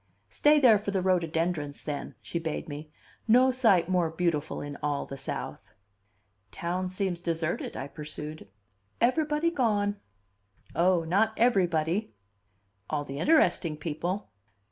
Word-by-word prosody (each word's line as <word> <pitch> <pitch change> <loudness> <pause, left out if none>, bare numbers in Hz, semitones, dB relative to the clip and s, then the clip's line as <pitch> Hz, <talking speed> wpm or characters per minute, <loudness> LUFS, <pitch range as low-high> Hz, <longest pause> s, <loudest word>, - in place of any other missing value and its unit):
"Stay 300 0 +4
there 235 -7 +6
for 205 - -4
the 195 -1 0
rhododendrons, 165 -4 0
then," 145 -2 -5
she 170 - -3
bade 160 -2 -4
me. 150 +1 -7 0.4
"No 250 +3 +6
sight 215 -10 +3
more 180 -3 +2
beautiful 160 -2 -1
in 145 0 -6
all 145 -1 -1
the 135 - -7
South." 135 - -5 0.8
"Town 180 +2 -2
seems 185 -2 -2
deserted," 165 -1 -2
I 135 - -4
pursued. 150 -2 -8 0.5
"Everybody 300 +6 +2
gone." 210 -8 +1 0.8
"Oh, 175 0 +3
not 200 +7 +2
everybody!" 180 - +1 0.7
"All 145 -1 -1
the 140 0 -6
interesting 190 - +3
people." 165 - -3
175 Hz, 125 wpm, -28 LUFS, 155-210 Hz, 0.8 s, there